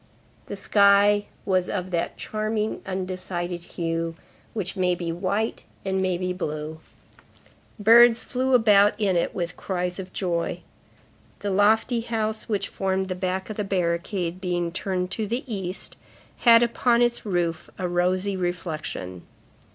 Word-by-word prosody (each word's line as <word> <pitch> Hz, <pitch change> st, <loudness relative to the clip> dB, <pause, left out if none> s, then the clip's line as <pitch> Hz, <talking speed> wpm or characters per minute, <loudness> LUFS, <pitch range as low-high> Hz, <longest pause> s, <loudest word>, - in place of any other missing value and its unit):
The -, -, -5 dB
sky 200 Hz, +1 st, +4 dB, 0.2 s
was 185 Hz, -2 st, +1 dB
of 185 Hz, -1 st, -3 dB
that 170 Hz, -1 st, -1 dB
charming, 215 Hz, 0 st, -2 dB
undecided 185 Hz, -2 st, -3 dB
hue, 165 Hz, -1 st, -3 dB, 0.4 s
which 190 Hz, -4 st, -3 dB
may 180 Hz, -2 st, +2 dB
be 170 Hz, -1 st, -3 dB
white 200 Hz, +6 st, -1 dB, 0.2 s
and 190 Hz, 0 st, 0 dB
may 185 Hz, -2 st, +1 dB
be 180 Hz, 0 st, -2 dB
blue. 155 Hz, -3 st, -4 dB, 1.0 s
Birds 230 Hz, +2 st, +7 dB
flew 260 Hz, +1 st, +1 dB
about 210 Hz, -2 st, +5 dB
in 200 Hz, -4 st, +2 dB
it 170 Hz, -, 0 dB
with 175 Hz, -1 st, -3 dB
cries 180 Hz, -1 st, -3 dB
of 185 Hz, -1 st, -7 dB
joy. 175 Hz, -3 st, -2 dB, 0.8 s
The 205 Hz, -, -2 dB
lofty 220 Hz, +4 st, +3 dB
house 220 Hz, -1 st, -3 dB
which 200 Hz, -2 st, 0 dB
formed 190 Hz, 0 st, -1 dB
the -, -, 0 dB
back 185 Hz, +2 st, -3 dB
of 215 Hz, -, -7 dB
the 210 Hz, -, 0 dB
barricade, 180 Hz, -1 st, -1 dB
being 175 Hz, -2 st, -1 dB
turned 185 Hz, 0 st, -2 dB
to 215 Hz, +2 st, -2 dB
the 240 Hz, +7 st, -2 dB
East, 195 Hz, -6 st, -4 dB, 0.4 s
had 235 Hz, -1 st, +7 dB
upon 240 Hz, 0 st, +3 dB
its 240 Hz, 0 st, 0 dB
roof 175 Hz, -5 st, -1 dB
a 185 Hz, -, -2 dB
rosy 185 Hz, +3 st, +1 dB
reflection. 165 Hz, -, -4 dB
190 Hz, 145 wpm, -25 LUFS, 175-210 Hz, 1.0 s, Birds